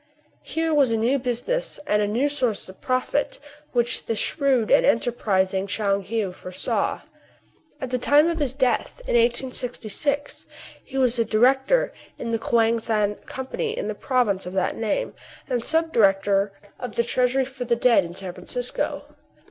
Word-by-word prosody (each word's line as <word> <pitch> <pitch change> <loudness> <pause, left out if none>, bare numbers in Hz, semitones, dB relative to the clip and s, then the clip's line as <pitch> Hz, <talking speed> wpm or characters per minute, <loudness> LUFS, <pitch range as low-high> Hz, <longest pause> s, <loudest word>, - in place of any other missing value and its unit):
Here 325 0 -1
was 280 -4 +4
a 225 - +1
new 245 +5 +2
business, 255 - -1
and 210 -6 +2
a 205 - +1
new 240 +7 +1
source 255 -7 -1
of 185 - -14
profit, 255 +3 -1 0.3
which 240 -1 +2
the 225 - 0
shrewd 265 -2 +1
and - - +6
enterprising 195 -5 +1
Tchoung 200 -1 0
Heou 205 -2 -2
foresaw. 180 0 -2 0.8
At 260 -2 -5
the 250 - 0
time 290 +5 +5
of 335 -1 -1
his 270 -3 -1
death, 260 - 0
in - - -2
1866, 250 +3 -1 0.4
he 270 - -7
was 250 -2 +2
a - - +4
director 265 - +3 0.2
in 230 - -4
the 230 - 0
Kouang 230 0 +2
Than 215 -2 0
Company 445 - -4
in - - -3
the - - -1
province 225 -9 0
of 180 - -6
that 190 -1 0
name, 230 - -2 0.3
and 245 -3 -1
sub 325 +3 +1
director 195 -1 +3 0.3
of 250 - -6
the 235 - +2
Treasury 255 +2 +1
for 260 -1 -6
the 235 0 +2
Dead 235 -3 +4
in 170 0 -8
San 185 -2 -5
Francisco. 240 +7 -3
240 Hz, 165 wpm, -24 LUFS, 210-270 Hz, 0.8 s, and